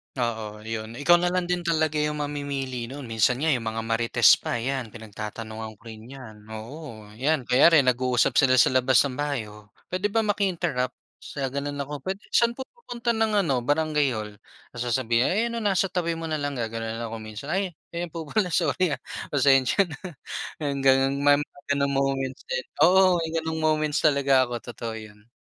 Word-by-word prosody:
Oo, 110 -3 -3
'yon. 110 0 -5
Ikaw 175 +6 +5
na 175 - +1
lang 180 0 0
din 180 0 -1
talaga 155 -3 0
yung 150 0 -1
mamimili 140 -4 -4
no'n. 140 +2 -8
Minsan 115 +1 +2
nga 160 - +3
yung 120 -4 -1
mga 110 0 -3
marites 115 +1 +4
pa, - - -3
yan, 125 +1 -2
pinagtatanungan 110 0 -7
ko - - -33
rin 110 +1 -12
yan. 110 -6 -12
Oo, 110 -1 -9
yan. 145 0 +1
Kunyari, 140 +4 +5
nag-uusap 125 -1 +2
sila 130 -1 +5
sa 130 - +5
labas 130 +1 +4
ng 140 - -2
bahay, 145 -5 -1
oh, 105 -1 -15 0.2
"Puwede 185 +3 0
ba 225 +2 +1
maki-interrupt?" 175 -11 -1 0.2
Sa 140 - -6
gano'n 140 +1 -3
ako, 145 +1 -6
"Puwede 190 +8 -5
saan 235 0 +3
po 265 - -5
pupunta 245 - -3
ng 220 -3 +2
ano, 135 -6 +1
barangay 145 -1 +1
hall?" 105 -1 -6 0.3
Tapos 120 0 -4
sasabihin, 120 0 +2
"Ayan, 230 +5 0
oh, - - -5
nasa 195 -1 +1
tabi 170 -2 -1
mo 165 -1 -5
nalang." 145 -2 -2
gagano'n 115 -1 -3
ako 115 0 -5
minsan, 110 +7 -7
"Ay, 190 -3 -1 0.2
ayan 170 +1 -3
po 165 0 -6
pala, 185 +5 0
sorry, 175 -6 +1
ah, 130 - -21 0.3
pasensya 135 +5 +4
na. 155 -6 -9 0.6
Yung 140 -1 -1
gano'n. 135 0 +4
May 145 0 +5
mga 140 - -20 0.2
ganong 140 0 +1
moments 135 -1 -1
din. 130 0 -2 0.2
Oo, 185 -1 +5
may 165 -1 -3
ganong 160 0 -2
moments 155 -1 +1
talaga 140 -3 +3
ako, 120 - -6 0.2
totoo 115 0 -6
'yon. 105 0 -12
140 Hz, 185 wpm, -25 LUFS, 115-160 Hz, 0.6 s, Ikaw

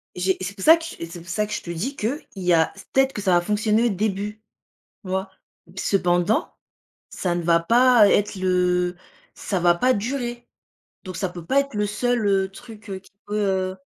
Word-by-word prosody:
J'ai 185 +1 0
c'est 185 +2 -4
pour 190 - -8
ça 325 +1 +8
que 330 - -8 0.2
et 165 - -4
c'est 170 0 -10
pour 170 - -14
ça 210 +4 -1
que 210 - -6
je - - -3
te 170 - -6
dis 235 - -3
qu'il 245 +8 -2 0.2
y 180 -2 +1
a 160 -1 +3
c 200 - -12
peut-être 270 0 +3
que 210 - -4
ça 185 -2 +2
va 175 - +4
fonctionner 215 +4 +1
au 240 - +3
début, 205 +1 -2 0.7
tu 185 - -9
vois? 190 +1 -2 0.5
Cependant, 180 +1 +1 0.5
ça 175 -2 -2
ne 175 - -2
va 170 0 +3
pas 235 +4 +5
ê - - +4
être 205 0 +1
le 180 -1 +1 0.4
ça 195 - -3
va 175 0 +4
pas 255 +9 +2
durer, 240 +2 -4 0.6
donc 185 -2 -7
ça 190 - -2
peut 175 -2 -10
pas 275 +7 +3
être 280 -4 -3
le 210 0 +1
seul, 240 +2 0
heu, 195 -1 +2
truc, 220 0 -13
heu, 190 - -4
qui 195 - -23 0.2
peut, 210 - -3
heu 190 -2 0
195 Hz, 220 wpm, -23 LUFS, 180-220 Hz, 0.7 s, ça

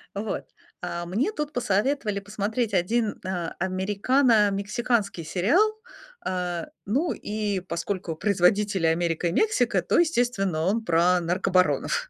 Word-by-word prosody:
Вот. 205 +1 -3 0.4
А 175 -1 -4
мне 225 - 0
тут 300 -5 -3
посоветовали 215 -1 0
посмотреть 210 +2 -2
1 210 +4 0
а, 180 -3 -3
американо-мексиканский 205 +1 +1
сериал. 290 - +2 0.5
Э, 180 - -2 0.2
ну, 275 - 0
и 210 -2 -2
поскольку 170 -1 -4
производители- 195 0 +2
Америка 165 +1 0
и 170 - 0
Мексика, 245 - +2
то, 175 - +1
естественно, 240 - +1
он 220 +6 0
про 175 +2 +3
наркобаронов. 180 - +1
200 Hz, 115 wpm, -25 LUFS, 180-235 Hz, 0.5 s, про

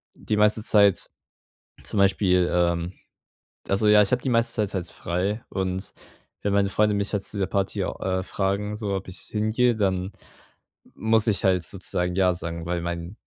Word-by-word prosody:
die 105 - -2
meiste 105 +1 +3
Zeit 100 -3 +4 0.8
zum - - -3
Beispiel, 95 -2 +3
ähm 85 0 +1 0.8
also 100 +2 +1
ja, 105 0 +7
ich 100 - 0
habe 125 - +1
die 130 - -1
meiste 115 0 +2
Zeit 105 -3 -1
halt 90 -2 -3
frei 95 +6 -3
und 95 0 -3 0.5
wenn 100 - 0
meine 100 -1 +3
Freunde 105 +1 +2
mich 100 +1 -1
halt 105 - -1
zu 105 - -3
dieser 95 -2 0
Party 100 0 -1
au - - -5
äh, 95 -1 0
fragen, 100 +2 -2
so, 105 -2 -3
ob 95 -1 -4
ich 95 - -6
hingehe, 110 +3 +1
dann 95 -2 -1 0.8
muss 110 -1 +2
ich 105 -3 +2
halt 90 -3 +3
sozusagen 90 -2 -2
ja 95 -1 +3
sagen, 85 -1 -6
weil 85 0 -1
mein 85 +3 -5
100 Hz, 180 wpm, -24 LUFS, 90-105 Hz, 0.8 s, ja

